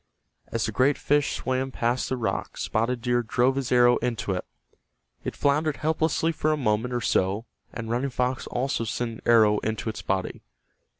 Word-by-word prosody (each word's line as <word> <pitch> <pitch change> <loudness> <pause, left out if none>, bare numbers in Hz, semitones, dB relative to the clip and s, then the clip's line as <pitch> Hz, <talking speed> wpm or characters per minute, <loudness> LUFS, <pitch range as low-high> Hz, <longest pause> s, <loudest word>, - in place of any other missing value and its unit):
As 115 - -1
the 110 - -2
great 130 +6 +3
fish 145 0 +1
swam 130 +1 -1
past 120 0 -1
the 130 - -1
rock 115 - -3
Spotted 115 +2 -1
Deer 120 -1 +2
drove 125 +3 +1
his 135 -2 -2
arrow 120 0 +5
into 115 -4 -2
it. 90 -1 -2 0.8
It - - -4
floundered 145 +1 +1
helplessly 160 +1 +1
for 155 -1 0
a 155 - +1
moment 115 -2 0
or 120 -1 -1
so, 100 +2 +1 0.3
and 115 - -6
Running 120 +4 -1
Fox 125 0 -1
also 125 -1 -1
sent 115 +1 -2
an 115 - -10
arrow 110 -3 +5
into 110 +1 -3
its 110 - -5
body. 95 -1 -2
120 Hz, 180 wpm, -26 LUFS, 115-135 Hz, 0.8 s, arrow